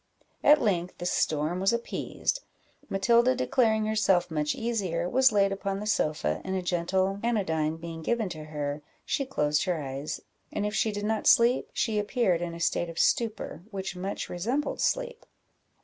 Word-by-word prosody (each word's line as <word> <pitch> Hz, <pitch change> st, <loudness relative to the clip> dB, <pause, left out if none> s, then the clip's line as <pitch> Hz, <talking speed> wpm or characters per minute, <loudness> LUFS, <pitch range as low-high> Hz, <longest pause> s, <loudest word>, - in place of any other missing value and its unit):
At 295 Hz, +1 st, +7 dB
length 180 Hz, -5 st, 0 dB
the 175 Hz, -, -6 dB
storm 155 Hz, 0 st, 0 dB
was 195 Hz, +1 st, +3 dB
appeased; 235 Hz, -, -2 dB, 0.5 s
Matilda, 235 Hz, +6 st, +3 dB
declaring 225 Hz, -4 st, +2 dB
herself 210 Hz, -5 st, +2 dB
much 150 Hz, -1 st, 0 dB
easier, 190 Hz, -8 st, -1 dB
was 260 Hz, +6 st, +4 dB
laid 200 Hz, -2 st, +3 dB
upon 195 Hz, 0 st, -2 dB
the 210 Hz, -, -5 dB
sofa, 150 Hz, -, 0 dB
and 190 Hz, 0 st, -3 dB
a 185 Hz, -, -2 dB
gentle 185 Hz, +3 st, 0 dB
anodyne 160 Hz, -9 st, 0 dB
being 165 Hz, 0 st, -7 dB
given 230 Hz, +5 st, 0 dB
to 155 Hz, -3 st, -7 dB
her, 150 Hz, -1 st, -4 dB, 0.2 s
she 275 Hz, -, -1 dB
closed 150 Hz, -, +1 dB
her 180 Hz, -3 st, 0 dB
eyes, 140 Hz, +1 st, -4 dB, 0.3 s
and 205 Hz, -, -2 dB
if 210 Hz, -, -2 dB
she 220 Hz, 0 st, +1 dB
did 205 Hz, 0 st, -4 dB
not 220 Hz, 0 st, 0 dB
sleep, 245 Hz, 0 st, +5 dB
she 220 Hz, -3 st, 0 dB
appeared 205 Hz, -5 st, +1 dB
in 170 Hz, -1 st, -4 dB
a -, -, -8 dB
state 170 Hz, 0 st, 0 dB
of 165 Hz, -, -9 dB
stupor, 220 Hz, -8 st, 0 dB
which 195 Hz, -3 st, -5 dB
much 190 Hz, +2 st, -4 dB
resembled 240 Hz, +12 st, -2 dB
sleep. -, -, -1 dB
195 Hz, 170 wpm, -28 LUFS, 170-225 Hz, 0.5 s, At